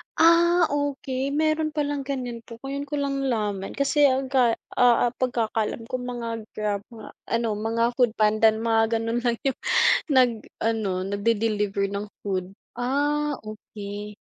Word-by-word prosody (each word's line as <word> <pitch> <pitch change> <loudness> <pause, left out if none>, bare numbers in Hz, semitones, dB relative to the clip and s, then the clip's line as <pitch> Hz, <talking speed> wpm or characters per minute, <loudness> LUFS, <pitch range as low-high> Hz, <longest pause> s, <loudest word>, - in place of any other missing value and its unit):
Ah, 340 +1 +5
okey, 275 -2 -2
meron 310 0 +1
palang 290 -1 -1
ganyan 250 -4 -3
po, 230 - -10
ngayon 280 +1 -4
ko - - -8
lang 280 0 -1
nalaman 210 -7 -2
kasi 285 +1 +4
aga 260 -3 +2 0.2
ah 245 -1 +5
ah, - - -14
pagkakaalam 230 -3 -1
ko - - -15
mga 245 -2 -5 0.3
Grab, 210 -2 -1
mga 220 -2 -10 0.3
ano, 230 0 0 0.2
mga 230 +1 +1
Foodpanda 220 -3 +3
mga 225 0 +2
gano'n 230 +1 -1
lang 240 -1 +2
yung 270 -2 0 0.5
nag-ano 225 -4 +1 0.2
nag-de-deliver 205 -1 0
ng 200 +1 -3 0.2
food. 185 -2 -2 0.3
Ah, 290 +4 0
okey. 210 -1 -8
235 Hz, 135 wpm, -25 LUFS, 215-275 Hz, 0.5 s, Ah